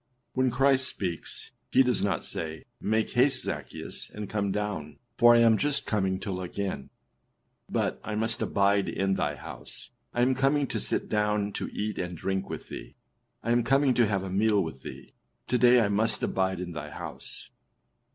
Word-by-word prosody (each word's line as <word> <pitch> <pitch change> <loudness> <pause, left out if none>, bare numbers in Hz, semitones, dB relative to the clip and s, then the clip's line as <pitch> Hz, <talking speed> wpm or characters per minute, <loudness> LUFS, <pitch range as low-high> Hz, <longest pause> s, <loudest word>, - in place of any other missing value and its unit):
When 130 0 +2
Christ 135 +1 +4
speaks, 90 -4 -2 0.2
he 130 - +6
does 125 -2 +1
not 100 - 0
say, 80 -1 -3 0.2
âMake 110 +1 +1
haste, 130 +1 +3
Zaccheus, - - -5
and 105 -1 -6
come 100 -1 -1
down, 100 -8 -3 0.2
for 120 0 +7
I 120 - +6
am 115 -2 +5
just 145 -1 0
coming 95 -3 0
to 100 - -3
look 90 0 -5
in;â 95 -9 -3 0.8
but - - -1
âI 105 -1 -4
must 115 +1 +1
abide 100 0 +2
in 95 0 0
thy 75 -5 -1
house; - - -9 0.2
I 120 - +1
am 130 +1 +3
coming 135 +2 +2
to - - -3
sit - - -1
down 105 -1 +1
to - - -4
eat 105 +1 -3
and 90 -1 -4
drink 95 +3 -2
with - - -6
thee; - - -8 0.5
I 115 - 0
am 120 0 +3
coming 135 +2 +3
to 120 -2 +3
have 95 -2 0
a 95 - -5
meal 105 0 +3
with 80 -5 -7
thee; 65 0 -10 0.3
to 125 - +1
day 125 0 +7
I 110 - +3
must 105 +2 +2
abide 95 -1 0
in 90 -1 -5
thy 75 -3 -6
house. - - -7
105 Hz, 190 wpm, -28 LUFS, 95-120 Hz, 0.8 s, for